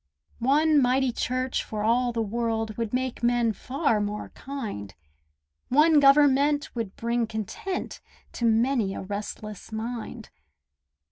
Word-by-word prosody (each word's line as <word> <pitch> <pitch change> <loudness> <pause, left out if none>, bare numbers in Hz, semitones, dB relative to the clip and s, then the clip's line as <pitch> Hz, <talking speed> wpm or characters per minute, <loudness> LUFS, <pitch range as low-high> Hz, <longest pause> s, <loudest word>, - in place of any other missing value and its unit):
One 295 +4 +4
mighty 255 +1 +2
church 255 +2 -1
for 210 -1 -4
all 240 +3 +2
the 230 -1 -1
world 225 0 -2
Would 230 -2 -3
make 255 0 -2
men 240 -1 +2
far 260 -2 0
more 205 0 -4
kind; 215 - -7 0.7
One 300 +3 +5
government 285 +1 +4
would 225 -5 -4
bring 235 0 -1
content 220 - -5 0.3
To 235 - -3
many 225 -2 +2
a - - -5
restless 210 +1 -6
mind. 230 0 -6
235 Hz, 125 wpm, -26 LUFS, 220-270 Hz, 0.7 s, One